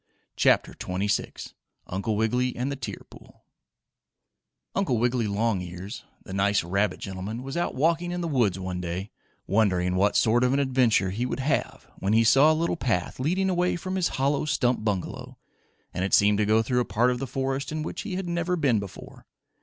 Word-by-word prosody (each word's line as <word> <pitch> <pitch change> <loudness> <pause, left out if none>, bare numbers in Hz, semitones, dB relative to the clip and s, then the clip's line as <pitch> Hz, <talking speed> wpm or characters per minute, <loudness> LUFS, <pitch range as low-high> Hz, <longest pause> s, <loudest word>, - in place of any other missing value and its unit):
CHAPTER - - +3
XXVI 100 +3 -3 0.3
UNCLE 100 +4 -2
WIGGILY 125 +3 0
AND 130 +3 -2
THE - - -2
TEAR 135 - -6
POOL - - -17 1.3
Uncle 185 -11 +1
Wiggily 120 0 +1
Longears, 100 -2 -3 0.2
the 95 - -9
nice 100 0 +2
rabbit 100 +4 0
gentleman, 100 +5 -5
was 135 +1 -6
out 175 0 -1
walking 165 +5 +1
in 175 0 -3
the 170 - -2
woods 120 - +1
one 90 -1 -4
day, 90 +3 -4 0.3
wondering 95 -4 +2
what 100 +3 +2
sort 120 +2 +3
of 125 +1 +2
an 140 - +2
adventure 125 -8 +2
he 120 +6 -2
would 130 - -3
have 140 +3 -1
when 100 +2 0
he 115 +1 +5
saw 135 +7 +6
a - - +2
little 170 +1 0
path, 110 - -1
leading 180 +8 +1
away 180 -1 +1
from 185 +2 -4
his 185 -2 +2
hollow 140 +3 +1
stump 125 -5 +1
bungalow, 100 -4 -3 0.6
and 90 - -2
it 95 - +3
seemed 105 0 +4
to 105 - +2
go 110 +1 +4
through 125 +2 0
a - - +2
part 120 +3 +2
of 125 - -2
the 135 - -3
forest 135 +2 -2
in 155 0 -3
which - - -5
he 195 - -5
had 190 -1 -3
never 170 +1 0
before 115 - -2
been. - - -54
120 Hz, 195 wpm, -26 LUFS, 100-140 Hz, 1.3 s, saw